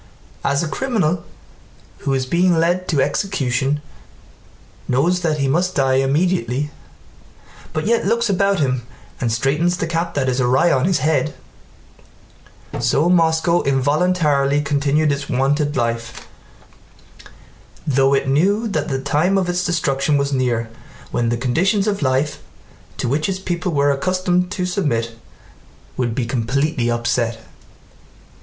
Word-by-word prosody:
As 140 Hz, +3 st, +1 dB
a -, -, -2 dB
criminal 180 Hz, -6 st, -1 dB, 0.8 s
who 135 Hz, -1 st, -1 dB
is 130 Hz, -1 st, -1 dB
being 175 Hz, +5 st, +2 dB
led 175 Hz, +3 st, +1 dB
to 145 Hz, -5 st, +2 dB
execution 145 Hz, -7 st, -1 dB, 1.1 s
knows 165 Hz, +9 st, +2 dB
that 160 Hz, -3 st, 0 dB
he 140 Hz, -2 st, 0 dB
must 175 Hz, +6 st, 0 dB
die 135 Hz, -2 st, +2 dB
immediately, 145 Hz, -1 st, 0 dB, 1.0 s
but 155 Hz, -, -3 dB
yet 230 Hz, -2 st, +1 dB
looks 235 Hz, +2 st, +1 dB
about 195 Hz, -1 st, +1 dB
him 130 Hz, -3 st, 0 dB, 0.4 s
and 120 Hz, -3 st, -1 dB
straightens 150 Hz, +9 st, +1 dB
the 170 Hz, -, -1 dB
cap 170 Hz, 0 st, -2 dB
that 135 Hz, -2 st, 0 dB
is 130 Hz, 0 st, 0 dB
awry 130 Hz, +7 st, +3 dB
on 130 Hz, +2 st, +2 dB
his 185 Hz, -1 st, +1 dB
head, 150 Hz, -2 st, +1 dB, 1.4 s
so 130 Hz, +7 st, +2 dB
Moscow 170 Hz, 0 st, +3 dB
involuntarily 145 Hz, +1 st, +2 dB
continued 145 Hz, +1 st, +1 dB
its 140 Hz, 0 st, -3 dB
wonted 145 Hz, +3 st, 0 dB
life, 115 Hz, -2 st, -3 dB, 1.6 s
though 135 Hz, -2 st, +3 dB
it 135 Hz, -, 0 dB
knew 195 Hz, +11 st, +2 dB
that 200 Hz, -, -2 dB
the 135 Hz, -1 st, -2 dB
time 150 Hz, +8 st, +1 dB
of 190 Hz, -2 st, 0 dB
its 180 Hz, 0 st, 0 dB
destruction 150 Hz, -4 st, +1 dB
was 140 Hz, 0 st, -1 dB
near 120 Hz, -3 st, 0 dB, 0.4 s
when 120 Hz, -1 st, 0 dB
the 120 Hz, -, 0 dB
conditions 180 Hz, -, +1 dB
of 205 Hz, -3 st, -1 dB
life 135 Hz, +2 st, 0 dB, 0.6 s
to -, -, -2 dB
which 150 Hz, +8 st, 0 dB
its 190 Hz, -, -1 dB
people 175 Hz, -2 st, -3 dB
were 145 Hz, -2 st, +2 dB
accustomed 180 Hz, +4 st, 0 dB
to 180 Hz, -1 st, -2 dB
submit 145 Hz, -, -1 dB, 0.8 s
would 120 Hz, -3 st, -1 dB
be 125 Hz, -, -1 dB
completely 125 Hz, +2 st, -1 dB
upset. 120 Hz, -1 st, -1 dB
145 Hz, 135 wpm, -20 LUFS, 130-175 Hz, 1.6 s, awry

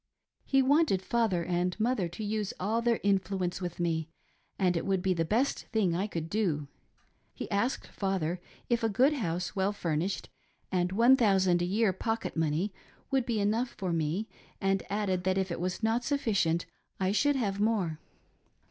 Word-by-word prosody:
He 270 Hz, -1 st, +3 dB
wanted 280 Hz, -, +3 dB
father 210 Hz, -7 st, +1 dB
and 180 Hz, +2 st, -1 dB
mother 220 Hz, -5 st, +1 dB
to 175 Hz, +6 st, -7 dB
use 210 Hz, -1 st, -2 dB
all 220 Hz, +5 st, 0 dB
their 235 Hz, -1 st, +2 dB
influence 190 Hz, -2 st, 0 dB
with 175 Hz, -1 st, -5 dB
me, 165 Hz, -2 st, 0 dB, 0.5 s
as 180 Hz, -2 st, +2 dB
it 165 Hz, -, 0 dB
would 190 Hz, -2 st, 0 dB
be 190 Hz, -1 st, +2 dB
the 165 Hz, -2 st, 0 dB
best 235 Hz, -, 0 dB
thing 200 Hz, -7 st, +1 dB
I 190 Hz, +4 st, 0 dB
could 165 Hz, -5 st, -4 dB
do. 165 Hz, -7 st, 0 dB, 0.7 s
He -, -, -5 dB
asked 230 Hz, +6 st, 0 dB
father 185 Hz, -3 st, -2 dB, 0.3 s
if 235 Hz, -1 st, +1 dB
a 225 Hz, -, +3 dB
good 255 Hz, +8 st, +4 dB
house, 180 Hz, -, -2 dB
well 195 Hz, +1 st, +1 dB
furnished, 175 Hz, -1 st, -2 dB, 0.4 s
and 180 Hz, -1 st, +1 dB
$i,ooo 200 Hz, -5 st, +5 dB
a -, -, +1 dB
year 200 Hz, +2 st, +2 dB
pocket 225 Hz, +4 st, -2 dB
money 160 Hz, +5 st, 0 dB, 0.4 s
would 265 Hz, -3 st, +1 dB
be 230 Hz, -3 st, 0 dB
enough 220 Hz, +5 st, 0 dB
for 185 Hz, -4 st, -2 dB
me, 165 Hz, +7 st, -1 dB, 0.3 s
and 195 Hz, -1 st, +1 dB
added 195 Hz, -3 st, 0 dB
that 190 Hz, +1 st, +1 dB
if 190 Hz, -2 st, 0 dB
it -, -, -3 dB
was 180 Hz, +1 st, -2 dB
• -, -, -18 dB
not 235 Hz, +5 st, +1 dB
enough 200 Hz, -12 st, +1 dB, 0.3 s
I 190 Hz, 0 st, +1 dB
should 285 Hz, +7 st, +3 dB
have 200 Hz, -6 st, -1 dB
more. 200 Hz, -8 st, +1 dB
195 Hz, 175 wpm, -30 LUFS, 175-225 Hz, 0.7 s, $i,ooo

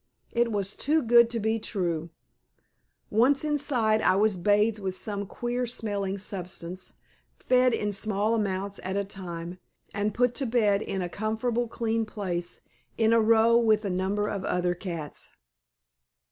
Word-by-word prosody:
It 235 Hz, 0 st, +1 dB
was 200 Hz, -1 st, -2 dB
too 310 Hz, +3 st, +1 dB
good 235 Hz, 0 st, +6 dB
to 235 Hz, -1 st, -2 dB
be 220 Hz, +1 st, 0 dB
true. 170 Hz, -7 st, -2 dB, 1.0 s
Once 255 Hz, +7 st, +4 dB
inside 260 Hz, -8 st, +2 dB
I -, -, +4 dB
was 210 Hz, +1 st, +3 dB
bathed 210 Hz, +4 st, +2 dB
with 190 Hz, -2 st, -3 dB
some 200 Hz, 0 st, -3 dB
queer 245 Hz, +3 st, -2 dB
smelling 200 Hz, -4 st, -2 dB
substance, 185 Hz, -2 st, -6 dB, 0.4 s
fed 255 Hz, 0 st, +3 dB
in 210 Hz, -2 st, -1 dB
small 210 Hz, +2 st, 0 dB
amounts 200 Hz, -2 st, -2 dB
at 190 Hz, +1 st, -2 dB
a 200 Hz, -, +1 dB
time, 175 Hz, -2 st, -7 dB, 0.3 s
and 205 Hz, +1 st, 0 dB
put 245 Hz, +3 st, +1 dB
to 265 Hz, -, 0 dB
bed 215 Hz, -4 st, +2 dB
in 190 Hz, -3 st, -3 dB
a -, -, -2 dB
comfortable 225 Hz, +5 st, -1 dB
clean 225 Hz, -1 st, -1 dB
place, 180 Hz, -5 st, -4 dB, 0.4 s
in 225 Hz, 0 st, +3 dB
a 230 Hz, -, +5 dB
row 230 Hz, +1 st, +5 dB
with 220 Hz, -2 st, +2 dB
a 195 Hz, -, -1 dB
number 195 Hz, +3 st, 0 dB
of 200 Hz, -3 st, -3 dB
other 180 Hz, -1 st, 0 dB
cats. 170 Hz, -4 st, -5 dB
210 Hz, 155 wpm, -27 LUFS, 190-230 Hz, 1.0 s, good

